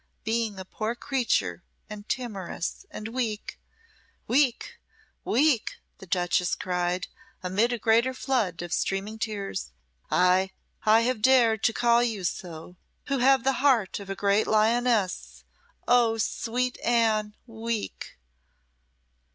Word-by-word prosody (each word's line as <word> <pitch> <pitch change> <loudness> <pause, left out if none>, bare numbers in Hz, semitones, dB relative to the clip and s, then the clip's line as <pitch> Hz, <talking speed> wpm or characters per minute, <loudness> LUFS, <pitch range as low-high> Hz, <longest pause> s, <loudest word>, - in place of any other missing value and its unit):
Being 225 -2 -1
a 190 - -7
poor 215 +4 -3
creature 260 -1 -1 0.2
and 210 -1 -10
timorous 210 - -4
and 215 +1 -7
weak 225 -3 -3 0.3
" - - -36
"Weak! 255 -1 +1 0.4
weak!" 270 -2 +2 0.2
the 190 - -12
duchess 175 0 +1
cried, 180 0 -1 0.4
amid 200 +6 +1
a 240 - -1
greater 230 +3 +2
flood 215 -11 -1
of 175 0 -5
streaming 200 +3 -2
tears 200 - -4 0.4
"ay, 185 +1 +3 0.4
I 220 +1 +6
have 240 -1 -1
dared 230 -3 +4
to 225 - +3
call 235 0 +3
you 225 -5 -1
so, 175 0 -5 0.3
who 275 -1 +1
have 265 0 +4
the 270 - +2
heart 245 -10 +2
of 200 -1 -10
a 195 - -3
great 200 +2 +2
lioness. 220 -2 +1 0.4
Oh, 235 -2 +4
sweet 245 +3 -2
Anne 220 -3 +2
weak!" 225 -2 -5
220 Hz, 125 wpm, -27 LUFS, 195-240 Hz, 0.4 s, I